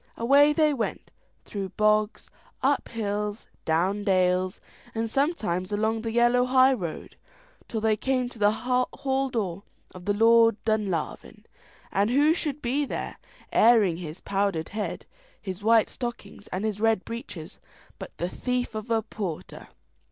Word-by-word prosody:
Away 280 +5 +5
they 305 0 +3
went, 235 -5 -4 0.3
through 195 -2 -5
bogs, 215 0 +1 0.3
up 275 +1 +2
hills, 210 -1 -3 0.2
down 185 +6 +1
dales, 185 -1 +1 0.4
and 225 0 -1
sometimes 220 - -1
along 220 +2 0
the 225 0 -3
yellow 240 +2 +3
high 260 +1 +5
road, 175 -10 -6 0.5
till 220 - -3
they 220 0 +3
came 255 +2 0
to 240 - -13
the 205 0 +5
hall 255 +3 -1
door 195 -7 -2 0.3
of 180 -1 -11
the 205 - +2
Lord 230 +1 +5
of - - -40
Dunlavin, 210 -7 -2 0.5
and 200 +2 +2
who 290 +5 +4
should 300 -4 -4
be 265 +5 +1
there, 280 - -5 0.3
airing 215 -7 +5
his 170 0 -8
powdered 195 -5 -1
head, 210 +1 -4 0.3
his 190 0 -7
white 225 0 +4
stockings, 230 -4 -7
and 190 +4 -3
his 210 -1 -2
red 225 -3 +2
breeches, 235 +4 -8 0.4
but - - -9
the 175 - -1
thief 250 +5 -2
of 215 +1 -6
a 225 -1 +1
porter. 200 -7 -6
220 Hz, 150 wpm, -26 LUFS, 200-245 Hz, 0.5 s, Away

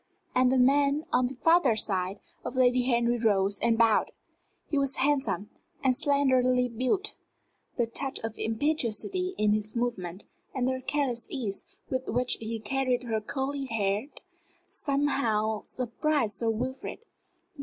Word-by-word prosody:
And 255 0 +4
the 265 - +3
man 280 +3 +3
on 250 0 +3
the 265 - -7
farther 325 -3 +4
side 195 -2 -1 0.2
of - - -5
Lady 250 -1 +4
Henry 240 -1 +2
rose 200 -3 +2
and 230 0 +2
bowed. 225 -2 +4 0.6
He 290 - 0
was 275 -1 0
handsome, 270 -7 0 0.3
and 260 -2 +3
slenderly 255 -3 +3
built. 255 - 0 0.6
The 240 - +2
touch 265 +4 -2
of 225 -1 -4
impetuosity 300 - 0
in 210 0 +3
his 215 +1 -2
movement, 205 -6 -3 0.3
and 255 -1 0
the 260 0 -1
careless 265 -5 -1
ease 210 -7 -3 0.3
with 260 0 -2
which 250 +2 +1
he 225 0 -4
carried 255 +2 0
his 220 -3 -2
curly 275 0 -2
head, 210 -1 -1 0.6
somehow 235 -7 0
surprised 255 -1 -1
Sir 230 - 0
Wilfrid. 255 - -4
250 Hz, 140 wpm, -28 LUFS, 220-275 Hz, 0.6 s, And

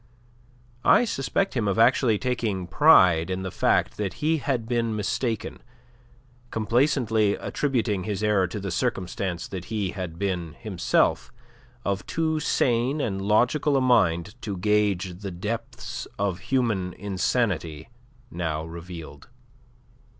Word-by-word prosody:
I 245 - +5
suspect 195 - -1
him 115 -4 0
of 100 - 0
actually 115 -1 +4
taking 110 -6 -2
pride 90 - +5
in 95 0 -2
the 95 - -4
fact - - +1
that 100 -3 -2
he 160 +2 +1
had 130 -6 -2
been 115 -2 0
mistaken, 110 +2 -2 0.9
complacently 115 -2 +2
attributing 115 -9 -1
his 105 +1 -3
error 105 -3 +3
to 105 - -5
the 100 -1 -4
circumstance 95 -4 -2
that 95 -3 -6
he 105 -4 -2
had 90 -5 -6
been, 90 -4 -2
himself, 105 -7 0 0.5
of 100 -1 -1
too 160 -1 0
sane 125 0 +1
and 95 -8 -2
logical 125 +8 +2
a - - +2
mind 100 -7 +2
to 100 -3 -4
gauge 100 -2 +1
the 100 -1 -5
depths 105 +6 -5
of 100 -3 -1
human 110 -9 0
insanity 95 -5 -1 0.4
now 80 -2 -3
revealed. 85 -3 -9
105 Hz, 130 wpm, -25 LUFS, 90-120 Hz, 0.9 s, I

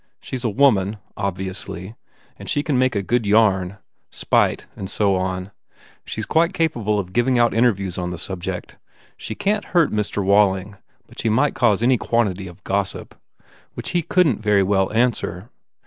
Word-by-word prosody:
She - - -7
s 125 - -5
a 115 - +1
woman 105 -4 +3 0.2
obviously 95 0 -5 0.4
and - - -9
she 145 - +1
can 150 - -1
make 130 -2 +2
a 100 - 0
good 115 +1 0
yarn. 100 -3 +3 0.3
Spite, - - +1
and 95 - -6
so 100 -1 +1
on. 95 +1 -3 0.5
She - - -4
s - - -4
quite 170 +3 +2
capable 115 -10 0
of 95 -2 -4
giving 120 +2 +2
out 120 0 +3
interviews 100 -6 +1
on 90 -1 -2
the 90 - -5
sub 90 +1 -5
ject. - - -6 0.4
She 110 - -6
can 210 - 0
t - - -16
hurt 170 -4 +2
Mr.Walling 100 -1 +1 0.3
but - - -14
she 115 - 0
might 135 +7 +2
cause 115 -3 +2
any 125 -1 +3
quantity 100 -5 0
of 90 +1 -13
gossip, 100 0 -2 0.6
which - - -5
he 175 - +1
couldn 165 - +2
t - - -14
very 105 -2 +3
well 95 0 +1
answer. 115 -3 -1
105 Hz, 180 wpm, -21 LUFS, 95-120 Hz, 0.6 s, woman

